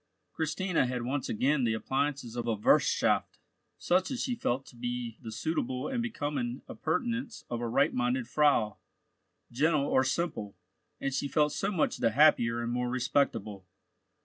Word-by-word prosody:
Christina 160 -1 0
had 125 -1 -3
once 130 +2 -2
again 135 +5 +1
the 115 -2 +2
appliances 135 0 -2
of 120 -1 -3
a 115 - +1
wirthschaft, 105 - +2 0.4
such 185 +1 +1
as 255 -2 -2
she 250 - -1
felt 135 - -1
to - - -15
be 120 -1 -4
the 115 -3 -7
suitable 130 0 -2
and 250 -3 -1
becoming 145 - -3
appurtenance 230 - -3
of 120 0 -2
a 120 - -1
right 115 - +2
minded 125 0 0
Frau, 125 -7 +2 0.7
gentle 145 +3 +2
or 130 -2 +3
simple, 130 - -2 0.4
and 135 - -2
she 140 +1 -1
felt 150 +1 +2
so 195 - -1
much 175 -6 0
the 115 - +2
happier 120 -3 +4
and 120 - -2
more 125 0 -1
respectable. 115 -6 -1
130 Hz, 160 wpm, -30 LUFS, 120-150 Hz, 0.7 s, happier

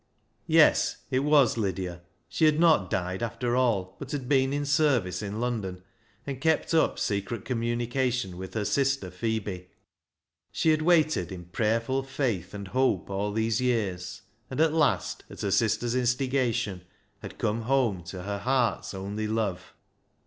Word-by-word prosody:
Yes, - - +4
it 130 - +2
was 140 -4 +4
Lydia. 90 -3 -3 0.3
She 160 - +1
had 155 0 +4
not 160 - +4
died 90 +2 -2
after 120 +1 -1
all, 115 -8 +1
but 140 - -7
had 135 -4 -4
been 135 -1 +3
in 145 +1 -1
service 135 - +2
in 105 +1 -4
London, 105 -7 -3 0.4
and 135 -2 -5
kept 160 0 +1
up 160 - +3
secret 100 +1 -2
communication 120 -3 -1
with 95 +3 -8
her 105 -2 -1
sister 135 -6 0
Phebe. 100 -2 -3 0.8
She 160 - +1
had 155 0 +2
waited 155 - +3
in 90 -2 -7
prayerful 115 +8 0
faith 120 - -2
and 100 -1 -7
hope 130 -3 +1
all 100 +2 -1
these 110 +2 0
years, 95 -7 -1 0.3
and 130 - -5
at 160 -1 +4
last, 155 -4 +1
at - - -9
her 100 - -1
sister's 115 +4 +1
instigation, 125 -5 0 0.4
had - - -9
come 110 +2 -1
home 115 -7 +1
to 95 0 -7
her 100 +1 -3
heart's 125 -3 0
only 100 +3 -4
love. 105 -5 -2
115 Hz, 155 wpm, -27 LUFS, 100-135 Hz, 0.8 s, Yes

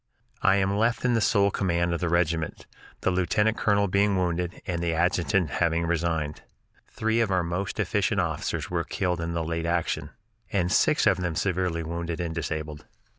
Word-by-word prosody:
I - - +4
am 100 0 +1
left 115 +3 +1
in 120 -2 +3
sole 100 -2 +3
command 85 -3 0
of 85 - -1
the 90 - -1
regiment, 85 -2 0 0.4
the - - +1
lieutenant 105 +5 +1
colonel 100 -2 +2
being 100 +1 +2
wounded 90 -1 -1
and 85 -2 -2
the 85 -1 0
adjutant 90 -1 +1
having 85 -1 +1
resigned. 80 -3 -1 0.5
Three 110 +1 0
of 115 -3 +2
our 90 -2 +2
most 90 +3 -3
efficient - - +1
officers - - -2
were - - 0
killed 90 -3 -2
in 85 0 -3
the 85 - -1
late 85 +1 -2
action, 85 0 -1 0.4
and 90 -3 +1
six 155 +9 +3
of 95 -4 +4
them 85 -3 -2
severely 90 -2 0
wounded 85 +1 -4
and 85 -2 -2
disabled. 75 -2 -4
85 Hz, 175 wpm, -26 LUFS, 85-100 Hz, 0.5 s, I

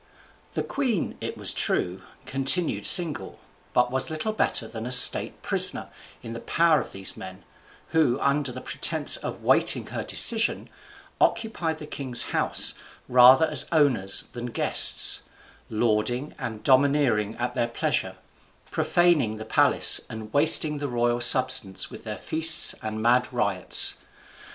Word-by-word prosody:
The - - -3
queen 250 - -4
(it - - -7
was - - -5
true) 90 +2 -1 0.2
continued 135 - -2
single, 170 -5 +3 0.3
but 125 0 0
was 130 0 -1
little 160 +8 -5
better 120 - -2
than 110 +1 -9
a - - -7
state 125 0 +5
prisoner - - 0 0.3
in 115 -1 -9
the 115 - -8
power 165 +2 0
of - - -11
these 95 -1 -4
men, 95 0 -12 0.5
who, 150 -6 0
under 140 -1 -2
a - - -8
pretence 145 +3 +2
of - - -7
waiting - - +1
her - - -7
decision, 230 -1 +2 0.5
occupied 195 -8 -2
the 155 - -11
king's 130 -4 -2
house - - -1 0.3
rather 125 +4 +5
as - - 0
owners 130 - 0
than 120 0 -7
guests, 120 - +4 0.5
lording 120 +5 -3
and 115 -5 -8
domineering 130 -6 0
at 120 +1 -5
their 120 - -2
pleasure, 115 - -4 0.5
profaning 160 -11 0
the 110 - -10
palace 110 - +3
and 110 -1 -10
wasting 150 0 +4
the 145 -1 -5
royal 120 0 -2
substance 120 -5 0
with - - -13
their - - -6
feasts 160 -1 +3
and 110 0 -6
mad 125 +2 +1
riots. 100 -7 -1
125 Hz, 140 wpm, -23 LUFS, 115-155 Hz, 0.5 s, state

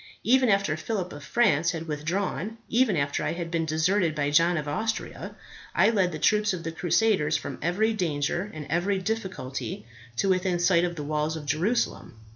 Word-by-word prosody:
Even 255 0 +4
after 195 -7 +2
Phillip 185 +2 -3
of 145 - -9
France 175 -5 +2
had 165 0 -5
withdrawn; 175 - -2
even 230 -6 +2
after 140 0 -1
I - - -1
had 170 -1 -5
been 165 -1 0
deserted 160 +2 +1
by 145 -1 0
John 170 +3 +4
of 150 -1 -3
Austria, 220 +10 -3 0.4
I - - +5
led 190 -5 +2
the 155 - -4
troops 210 +5 +2
of 175 -2 -5
the 165 - -3
crusaders 175 +1 +2
from - - -7
every 205 +7 +1
danger 175 0 -1
and 155 -2 -7
every 190 +4 +1
difficulty 185 - -4 0.3
to 160 - 0
within 185 -1 +1
sight 175 0 +3
of 175 -1 -3
the 150 - -5
walls 150 +1 -1
of 155 -2 -7
Jerusalem. 170 - -1
175 Hz, 185 wpm, -26 LUFS, 155-200 Hz, 0.4 s, I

